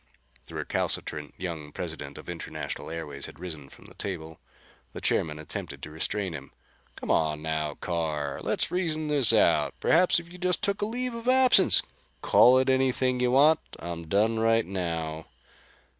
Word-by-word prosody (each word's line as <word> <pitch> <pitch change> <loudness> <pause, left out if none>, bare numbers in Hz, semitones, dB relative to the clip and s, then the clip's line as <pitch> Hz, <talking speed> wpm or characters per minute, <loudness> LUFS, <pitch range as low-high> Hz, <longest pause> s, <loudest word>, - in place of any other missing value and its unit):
The - - -11
recalcitrant 75 -1 -3
young 80 -5 -6
President 75 -4 -6
of - - -11
International - - -6
Airways 75 -4 -6
had - - -13
risen 80 -6 -7
from - - -16
the - - -14
table. 80 0 -6 0.5
The - - -6
chairman 75 -1 0
attempted 75 -1 -6
to 75 - -7
restrain 95 +4 -2
him. 70 -3 -8 0.5
"Come - - -4
on 75 -1 +1
now, 80 -2 -2
Carr, 80 -5 -3
let's - - 0
reason 155 -4 -1
this 140 -5 +5
out. - - +3
Perhaps 175 +1 +4
if 170 0 -12
you 180 - -11
just 180 -1 0
took 200 0 0
a 205 - 0
leave 250 +2 -3
of 230 +1 -7
absence 255 -7 +6 0.2
" - - -37
"Call 125 +1 +6
it 130 +1 +2
anything 130 -1 +2
you 125 0 +2
want. 145 +5 +5 0.2
I'm 85 -1 -6
done 110 +5 +2
right 115 0 +3
now." 80 -4 -4
90 Hz, 170 wpm, -27 LUFS, -, 0.5 s, absence